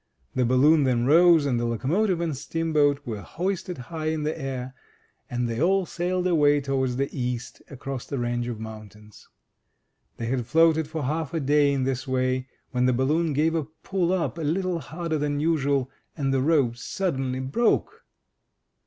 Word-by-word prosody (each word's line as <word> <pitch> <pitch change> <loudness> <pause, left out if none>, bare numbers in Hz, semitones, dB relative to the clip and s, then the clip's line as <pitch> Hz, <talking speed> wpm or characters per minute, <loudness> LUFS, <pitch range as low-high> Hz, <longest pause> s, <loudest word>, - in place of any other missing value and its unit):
The 125 - +1
balloon 145 +5 +4
then 125 -3 +1
rose, 165 +1 +6
and 125 -4 +1
the 120 - -1
locomotive 165 - 0
and 165 -4 -1
steamboat 145 -1 0
were 110 -4 -4
hoisted 180 - -3
high 155 +5 -5
in 155 -1 -1
the 155 +1 -1
air, 130 -3 -5 0.6
and 120 0 -1
they 115 +2 -3
all 190 +2 +3
sailed 180 +2 -2
away 145 -5 +4
towards 135 -2 -1
the 140 +2 0
East, 125 -2 -4
across 135 -1 -6
the 140 - -3
range 120 0 -1
of 120 -3 -5
mountains. 105 -1 -11 0.9
They 115 - -4
had 120 -1 -2
floated 160 +1 +4
for 155 -1 -4
half 155 +4 -2
a - - +1
day 145 0 +3
in 135 -2 0
this 135 +1 -2
way, 130 0 0 0.2
when 125 -1 +1
the 130 - +3
balloon 150 +6 +1
gave 155 +3 +2
a 160 -3 -1 0.2
pull 185 -3 0
up, 175 -2 -1
a - - -3
little 175 +3 0
harder 160 +4 -3
than 145 0 -1
usual, 140 -4 +1 0.3
and 135 -3 0
the 135 - +2
rope 135 -5 +2
suddenly 135 -5 -2
broke! 140 - 0
140 Hz, 175 wpm, -25 LUFS, 130-165 Hz, 0.9 s, rose